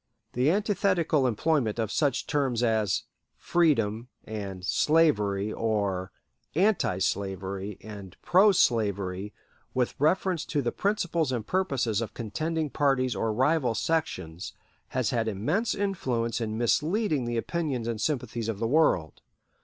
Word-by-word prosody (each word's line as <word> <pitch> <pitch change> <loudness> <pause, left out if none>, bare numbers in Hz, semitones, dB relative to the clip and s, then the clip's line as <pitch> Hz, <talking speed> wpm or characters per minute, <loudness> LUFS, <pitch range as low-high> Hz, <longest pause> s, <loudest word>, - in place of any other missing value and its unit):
The 125 +4 +2
antithetical 185 -7 +2
employment 125 -1 +1
of 110 -2 -1
such 140 -4 +1
terms 135 -6 0
as 110 -4 +1 0.3
freedom 120 -10 +1 0.2
and 100 -4 -6
slavery, 105 - +2
or 100 -5 -1 0.4
"anti 185 - +2
slavery" 95 +1 -3
and 100 -3 -10
"pro 195 +4 +6
slavery," 100 - +1 0.4
with 125 -1 +1
reference 180 +3 +2
to 145 -3 -1
the 120 - 0
principles 175 -7 0
and 120 -4 -2
purposes 135 - 0
of 110 -1 -5
contending 155 +7 -2
parties 130 -4 +1
or 115 - 0
rival 130 +1 +2
sections, 95 - -2 0.3
has 130 -4 -1
had 115 -3 0
immense 145 - 0
influence 125 - -1
in 110 -1 -2
misleading 150 - +1
the 120 0 -2
opinions 135 -3 -2
and 115 -2 -3
sympathies 120 -6 -2
of 110 - -2
the 115 - -2
world. 115 - +2
120 Hz, 130 wpm, -27 LUFS, 105-160 Hz, 0.4 s, pro